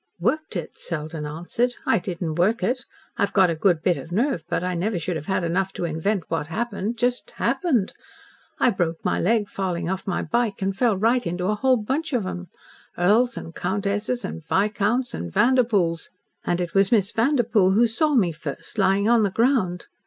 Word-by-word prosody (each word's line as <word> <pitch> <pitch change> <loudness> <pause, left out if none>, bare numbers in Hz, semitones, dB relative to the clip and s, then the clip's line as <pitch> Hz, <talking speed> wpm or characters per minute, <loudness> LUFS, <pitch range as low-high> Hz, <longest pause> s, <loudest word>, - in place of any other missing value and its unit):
"Worked 310 -7 -1
it!" 170 -4 -5
Selden 155 -2 -5
answered. 175 +11 -2
"I - - +3
didn't 175 -3 -4
work 190 +8 +1
it. 250 +1 -1 0.3
I've 200 - 0
got 190 -3 +5
a - - -1
good 170 -1 +2
bit 180 -2 +2
of 165 - -9
nerve, 220 - 0
but - - -1
I 180 0 -1
never 185 +4 -1
should 170 +1 -2
have 155 -1 -6
had 190 -2 0
enough 185 +3 0
to 175 - -3
invent 170 +4 -1
what 160 -3 -2
happened 220 +4 -3
just 245 +1 0
HAPPENED. 255 - 0 0.6
I 250 - +3
broke 170 -4 -2
my - - +1
leg 215 +2 +2
falling 180 -3 -2
off 190 +1 -4
my 180 - -1
bike, 220 +4 0
and 195 0 -1
fell 225 -2 +2
right 230 +3 +2
into 175 +1 -2
a 210 - +2
whole 255 +4 +3
bunch 270 +8 -2
of 240 -4 +1
them 185 -1 -5 0.5
earls 225 +7 +3
and 165 - -7
countesses 205 +6 -2
and 160 - -6
viscounts 210 +7 0
and 85 0 -5
Vanderpoels. 210 - +2 0.3
And 175 - 0
it 175 -2 -3
was 195 0 +3
Miss 205 -4 +3
Vanderpoel 225 -6 +2
who 230 +4 +5
saw 285 +7 +1
me 190 -9 +3
first 160 +5 -6
lying 195 +1 +3
on 235 0 +5
the 205 - +2
ground. 210 -4 +1
195 Hz, 195 wpm, -24 LUFS, 175-235 Hz, 0.6 s, got